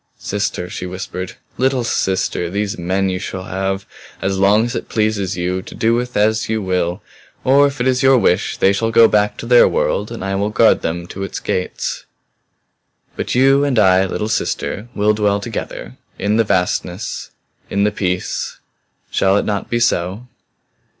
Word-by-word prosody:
"Sister!" 100 -3 -3
she 90 0 -6
whispered. 90 0 -6 0.3
"Little 130 -1 +2
sister! 95 -5 -1
These 100 +2 -2
men 95 +3 0
you 90 0 -2
shall 95 0 -5
have 95 +1 -3 0.3
as 95 0 -1
long 105 +3 +4
as 120 +1 -4
it - - -5
pleases 105 -4 0
you 90 +1 -1
to - - -11
do 115 +1 +2
with 125 0 -1
as 110 +1 +2
you 110 0 0
will. 90 -1 -1 0.4
Or 140 +2 +5
if 140 -1 -6
it 125 - 0
is 130 -1 +2
your 135 0 +6
wish 90 -6 +1
they 95 - +4
shall 115 +3 0
go 115 0 +6
back 105 -1 +1
to - - -7
their - - +6
world - - 0
and - - -5
I 95 - -2
will 100 +2 0
guard 110 +1 +4
them 85 +1 -3
to 95 - -7
its 95 - -4
gates. 90 - -3 1.1
"But - - -3
you 135 +2 +5
and 140 -4 0
I, 95 -3 +5
little 105 +3 -3
sister, 105 -1 -2
will 105 +1 +3
dwell 105 -1 +1
together 110 +2 -6 0.2
in 105 +2 0
the 115 - +4
vastnesses 95 -1 -2 0.4
in 100 +1 +1
the 105 - +2
peace. 90 -3 -2 0.5
Shall 95 +1 +3
it - - 0
not 100 -2 -2
be 120 - 0
so?" 100 -1 0
100 Hz, 180 wpm, -18 LUFS, 95-115 Hz, 1.1 s, your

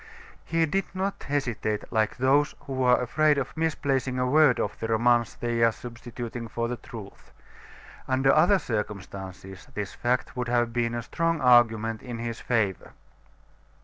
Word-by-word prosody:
He 165 0 +1
did 195 +5 0
not 190 +1 -2
hesitate 120 -7 -1
like 110 -2 +1
those 140 +3 +2
who 130 -1 -4
are 125 -1 +4
afraid 150 +4 +2
of 135 -2 -3
misplacing 140 -5 -1
a 125 - +1
word 145 -1 +4
of 100 - -2
the 115 - -3
romance 120 +1 +2
they 120 -1 -2
are 115 - +5
substituting 120 0 -7
for 115 +1 -2
the 120 0 -4
truth. 110 -5 -11 0.8
Under 135 +1 +3
other 195 +3 +5
circumstances, 95 - -6
this 105 -2 -4
fact 125 +2 -1
would 125 -1 -2
have 120 -1 +1
been 120 -1 0
a 120 - -3
strong 165 +5 -1
argument 115 -4 +4
in 120 -3 -6
his 115 0 -4
favor. 105 -6 -1
120 Hz, 155 wpm, -26 LUFS, 115-135 Hz, 0.8 s, are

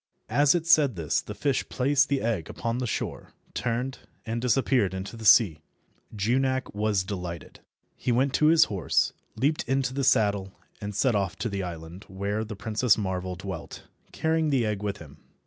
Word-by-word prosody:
As 145 +2 +4
it 170 -2 -1
said 150 - +5
this 80 -4 0
the - - -8
fish 140 -3 -1
placed 140 +2 +2
the 140 -1 +1
egg 110 -9 -2
upon 115 0 -3
the 125 - -2
shore, - - -4 0.2
turned, 125 +3 -2 0.3
and 115 0 -3
disappeared 125 -5 +2
in 95 - -3
the 110 +3 -9
sea. 95 -6 +6 0.6
Junak 130 +5 0
was 105 -2 +1
delighted. 90 -4 -6 0.4
He 125 - -2
went 130 +3 +2
to 155 - +3
his 165 0 +7
horse, 95 -5 0 0.2
leaped 140 +7 +1
into 135 -1 +1
the 135 +1 -1
saddle, 100 -5 +2 0.2
and 105 0 -5
set 125 +4 +2
off 100 -4 0
to 120 - -3
the 100 -1 -3
island 85 +1 -7
where 100 +3 -2
the 105 -1 -7
Princess 110 +2 +2
Marvel 95 -3 -3
dwelt, 95 -2 -7 0.3
carrying 160 -1 0
the 130 -5 +2
egg 105 -2 -2
with 105 -1 -3
him. 75 -2 -13
110 Hz, 180 wpm, -27 LUFS, 95-130 Hz, 0.6 s, his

